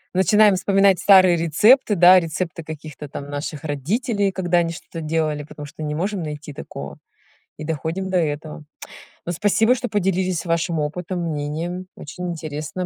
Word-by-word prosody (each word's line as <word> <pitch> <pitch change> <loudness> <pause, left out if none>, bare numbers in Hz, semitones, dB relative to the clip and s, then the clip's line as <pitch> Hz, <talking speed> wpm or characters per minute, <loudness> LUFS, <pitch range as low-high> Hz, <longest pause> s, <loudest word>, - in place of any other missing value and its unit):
Начинаем 210 +2 +5
вспоминать 195 0 +3
старые 185 -3 +6
рецепты, 210 - +4
да, 180 +1 +7
рецепты 165 0 -3
каких-то 155 -2 -8
там 140 +1 -7
наших 145 0 -5
родителей, 195 - -1
когда 175 -2 +1
они 165 -1 0
что-то 165 0 -9
делали, 155 -1 -1
потому 145 0 -10
что 155 - -10
не 150 0 -3
можем 190 +3 -2
найти 150 -1 -6
такого. 70 0 -8 0.6
И 155 - -7
доходим 160 +5 -3
до 185 - +1
этого. 155 -1 -3 0.6
Ну 175 - -2
спасибо, 210 +7 +3
что 245 -1 -4
поделились 185 -3 0
вашим 165 -1 0
опытом, 175 +4 -3
мнением. 165 +3 -4
Очень 180 +4 -6
интересно 155 +2 -5
170 Hz, 155 wpm, -21 LUFS, 155-190 Hz, 0.6 s, да